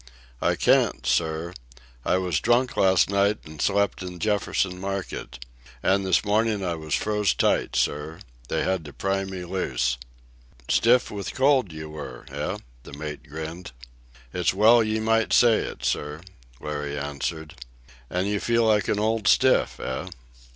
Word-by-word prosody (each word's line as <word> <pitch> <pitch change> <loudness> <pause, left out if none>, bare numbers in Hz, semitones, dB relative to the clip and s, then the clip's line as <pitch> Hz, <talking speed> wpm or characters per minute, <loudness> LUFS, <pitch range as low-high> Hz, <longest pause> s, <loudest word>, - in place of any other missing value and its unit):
"I - - +2
can't, 60 - +2
sir. 80 +5 0 0.5
I - - +2
was 90 -5 0
drunk 120 +2 +2
last 95 -2 +4
night 100 +1 +2
an' 75 -1 -11
slept 100 +3 +1
in 90 -1 -6
Jefferson 100 -2 0
Market. 95 -9 -5 0.5
An' 100 +1 +3
this 95 +1 +2
mornin' 105 0 +1
I 90 -2 -1
was 80 -2 -2
froze 105 -3 +1
tight, - - +1
sir. 75 +2 -1 0.3
They - - -1
had 95 -2 0
to 75 - -10
pry 95 0 -1
me 95 -2 -6
loose." 65 -9 -1 0.7
"Stiff 120 +2 +3
with 100 -1 -5
the - - -6
cold 130 - +3
you 80 0 -8
were, 70 -5 -8
eh?" - - -3 0.2
the 70 - -13
mate 75 0 -7
grinned. 80 +1 -7 0.6
"It's 90 0 +1
well 115 +4 +6
ye 110 0 -1
might 115 +1 +1
say 120 -2 +6
it, - - -5
sir," 75 +2 -2 0.4
Larry 75 0 -4
answered. 75 +2 -4 0.6
"And 90 +2 -1
you 105 0 0
feel 115 +1 +2
like 105 -3 +3
an 105 - +1
old 110 0 0
stiff, - - +3
eh?" 65 - -4
95 Hz, 160 wpm, -25 LUFS, 80-105 Hz, 0.7 s, well